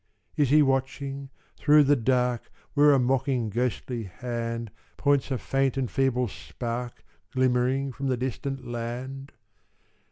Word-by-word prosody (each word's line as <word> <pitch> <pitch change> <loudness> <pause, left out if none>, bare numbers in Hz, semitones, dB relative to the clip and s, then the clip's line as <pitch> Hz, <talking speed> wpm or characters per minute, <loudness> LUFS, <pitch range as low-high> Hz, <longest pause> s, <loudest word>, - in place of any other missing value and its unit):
"Is 145 -4 +2
he 150 +2 +6
watching, 135 0 -1 0.3
through 150 0 +6
the 145 +1 +4
dark 125 -1 +1 0.2
Where 145 0 +6
a 140 - +5
mocking 130 -2 +1
ghostly 120 0 -2
hand 115 +2 -4 0.3
Points 140 -1 +2
a 130 - 0
faint 135 +1 0
and 130 -3 -1
feeble 130 -2 +1
spark 120 +3 -6 0.3
Glimmering 130 +1 +2
from 135 +2 -4
the 130 -2 +1
distant 130 +1 -3
land? 125 +4 -5
130 Hz, 130 wpm, -27 LUFS, 120-135 Hz, 0.3 s, he